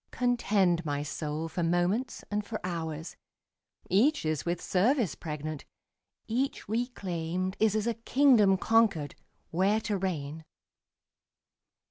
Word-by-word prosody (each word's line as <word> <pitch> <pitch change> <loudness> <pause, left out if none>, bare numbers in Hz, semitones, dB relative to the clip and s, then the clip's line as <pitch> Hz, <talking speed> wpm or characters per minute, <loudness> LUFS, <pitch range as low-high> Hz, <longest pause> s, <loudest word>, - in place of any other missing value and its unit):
Contend, 200 -8 +2
my 145 -2 -2
soul, 150 +2 -3
for 165 +2 -4
moments 175 +9 0
and 210 0 0
for 215 +1 -5
hours; 160 -3 -4 0.7
Each 255 - +3
is 155 -1 -1
with 175 0 0
service 225 - +2
pregnant; 155 -2 -5 0.6
each 260 +5 -1
reclaimed 185 -6 -2
Is 220 -1 +3
as 215 -1 0
a 235 - +1
kingdom 230 -4 +4
conquered, 205 -9 +2 0.4
where 195 +5 +2
to 210 -2 -1
reign. 160 -5 -3
185 Hz, 115 wpm, -29 LUFS, 160-225 Hz, 0.7 s, kingdom